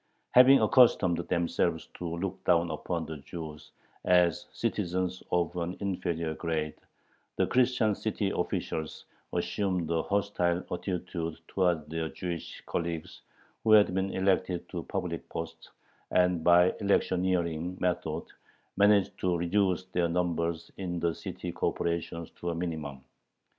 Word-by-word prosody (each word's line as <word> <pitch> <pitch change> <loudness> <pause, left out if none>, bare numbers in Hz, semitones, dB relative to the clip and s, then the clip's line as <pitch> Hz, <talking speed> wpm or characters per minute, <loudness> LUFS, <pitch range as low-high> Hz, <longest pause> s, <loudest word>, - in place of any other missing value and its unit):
Having 130 +2 +8
accustomed 100 -9 +5
themselves 85 -1 0
to 85 -1 -4
look 95 +1 -4
down 85 -1 +3
upon 85 -2 -3
the 80 0 -6
Jews 75 +1 -8 0.3
as 90 +3 +3
citizens 95 -5 -1
of 90 -1 +1
an 90 +1 -3
inferior 85 -5 -2
grade, 80 -2 -2 0.6
the - - +2
Christian 125 -4 +3
city 100 -1 -1
officials 80 -1 -3 0.3
assumed 90 -5 -1
a 80 -1 +2
hostile 95 -3 0
attitude 90 -3 -3
towards 90 -5 +1
their 80 +1 -3
Jewish 85 -1 -6
colleagues 85 -2 -4 0.4
who 110 - +5
had 105 -3 +6
been 95 +1 0
elected 95 -2 0
to - - -4
public - - -4
posts, 80 0 -6 0.4
and 90 -2 +2
by 90 +1 +6
electioneering 90 -3 +1
methods 90 -1 -2 0.4
managed 100 -1 +4
to 90 -2 +1
reduce 95 +1 +1
their 85 -1 +2
numbers 85 -1 -1
in 90 -2 -3
the 85 0 +1
city - - -6
corporations 85 0 -2
to 85 - -3
a 85 - -2
minimum. 80 -6 -4
90 Hz, 125 wpm, -29 LUFS, 85-95 Hz, 0.6 s, Having